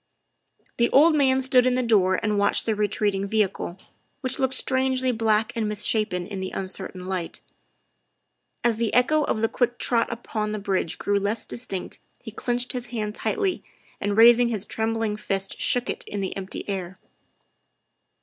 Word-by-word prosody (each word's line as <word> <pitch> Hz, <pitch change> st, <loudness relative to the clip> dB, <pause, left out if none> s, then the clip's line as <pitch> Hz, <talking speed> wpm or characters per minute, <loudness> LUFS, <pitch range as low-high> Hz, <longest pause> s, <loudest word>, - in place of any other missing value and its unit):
The 235 Hz, 0 st, +3 dB
old 310 Hz, +4 st, +6 dB
man 265 Hz, -3 st, +3 dB
stood 255 Hz, -1 st, +4 dB
in 250 Hz, -, +2 dB
the 255 Hz, -, +1 dB
door 190 Hz, -5 st, +3 dB
and 210 Hz, -1 st, +1 dB
watched 200 Hz, -, +2 dB
the 225 Hz, -, +1 dB
re 210 Hz, 0 st, +1 dB
treating 200 Hz, -1 st, -1 dB
vehicle, 195 Hz, -4 st, -1 dB, 0.4 s
which 260 Hz, -1 st, -4 dB
looked 265 Hz, -1 st, +2 dB
strangely 260 Hz, -1 st, +1 dB
black 225 Hz, 0 st, +1 dB
and 220 Hz, -2 st, -1 dB
mis 210 Hz, -1 st, -2 dB
shapen 210 Hz, -5 st, +1 dB
in 195 Hz, 0 st, -6 dB
the 190 Hz, 0 st, -3 dB
uncertain 185 Hz, -1 st, -6 dB
light. 185 Hz, -3 st, -4 dB, 1.2 s
As 235 Hz, -2 st, +2 dB
the 230 Hz, -2 st, 0 dB
echo 300 Hz, +5 st, +3 dB
of 215 Hz, -, -1 dB
the -, -, +4 dB
quick 245 Hz, +1 st, -1 dB
trot 235 Hz, -1 st, +1 dB
upon 215 Hz, -2 st, -3 dB
the -, -, -2 dB
bridge 195 Hz, -4 st, -1 dB
grew 200 Hz, 0 st, 0 dB
less 205 Hz, +3 st, -2 dB
distinct 195 Hz, -6 st, -5 dB, 0.2 s
he 225 Hz, -, -9 dB
clinched 245 Hz, +3 st, -1 dB
his 245 Hz, -1 st, -4 dB
hand 215 Hz, -2 st, -3 dB
tightly, 390 Hz, -, -1 dB, 0.4 s
and 205 Hz, 0 st, -2 dB
raising 235 Hz, +1 st, +7 dB
his 215 Hz, -3 st, -2 dB
trembling 225 Hz, -1 st, -2 dB
fist 195 Hz, -2 st, -3 dB
shook 245 Hz, 0 st, +3 dB
it -, -, -3 dB
in 205 Hz, -, -4 dB
the 190 Hz, -1 st, -3 dB
empty 195 Hz, 0 st, -6 dB
air. 190 Hz, -2 st, -4 dB
220 Hz, 175 wpm, -24 LUFS, 200-245 Hz, 1.2 s, raising